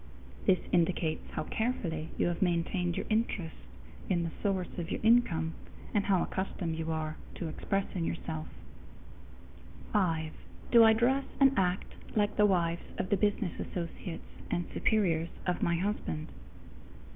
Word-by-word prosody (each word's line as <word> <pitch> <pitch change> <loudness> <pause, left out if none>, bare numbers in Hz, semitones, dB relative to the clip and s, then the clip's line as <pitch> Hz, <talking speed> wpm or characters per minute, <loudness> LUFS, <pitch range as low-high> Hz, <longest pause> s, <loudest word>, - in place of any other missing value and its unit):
_ - - -13
This 190 - +6
indicates 170 -2 +1
how - - -1
carefully 170 -8 -2
you - - +2
have 170 - -3
maintained 175 0 +1
your - - -2
interest 215 -7 0 0.5
in 175 -2 +2
the 165 - -3
source 190 -4 -1
of 170 0 -4
your - - -2
income, 175 -9 +4 0.4
and 205 -2 +2
how 190 -3 +3
accustomed 180 -3 -2
you 165 0 -2
are 155 -1 -2 0.2
to 170 - -4
expressing 190 +2 -2
yourself. 160 -1 -3 1.5
_5. 165 -6 +1 0.4
Do 235 -1 +9
I 220 0 +8
dress 260 +5 +2
and 275 -1 +6
act 185 -2 0 0.2
like 205 -1 +2
the 210 -1 +5
wives 170 -3 +1 0.2
of 185 - -2
the - - +6
business 205 -2 0
associates 170 0 -5 0.2
and 175 - 0
superiors 170 -7 +2 0.2
of 180 -1 0
my 170 - +2
husband? 170 -4 -2
180 Hz, 145 wpm, -31 LUFS, 165-205 Hz, 1.5 s, Do